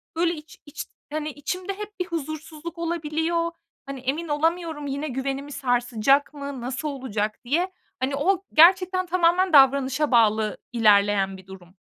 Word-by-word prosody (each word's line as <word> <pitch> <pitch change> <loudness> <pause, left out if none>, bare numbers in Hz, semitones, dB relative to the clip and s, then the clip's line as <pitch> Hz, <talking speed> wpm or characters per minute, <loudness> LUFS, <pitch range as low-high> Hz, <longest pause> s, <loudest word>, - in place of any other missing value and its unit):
böyle, 335 +1 +1
içi 310 -1 -11
iç 290 - -7 0.3
hani, 310 0 -2
içimde 360 +7 -4
hep 420 -1 -8
bir 360 - -1
huzursuzluk 315 0 -6
olabiliyor. 335 0 -1 0.3
Hani, 275 -1 -6
emin 280 +7 -2
olamıyorum 320 0 -1
yine 280 +3 -3
güvenimi 275 +2 -4
sarsacak 250 0 +1
mı, 280 -3 -6
nasıl 260 +5 -4
olacak 220 -6 -3
diye, 335 +9 0 0.3
hani, 265 +2 -1
o 370 +6 +1
gerçekten 370 +3 +5
tamamen 360 0 +2
davranışa 275 +1 +4
bağlı 220 -3 +3 0.2
ilerleyen 200 -3 +3
bir 185 - -16
durum, 185 -1 -13
290 Hz, 140 wpm, -24 LUFS, 255-335 Hz, 0.3 s, gerçekten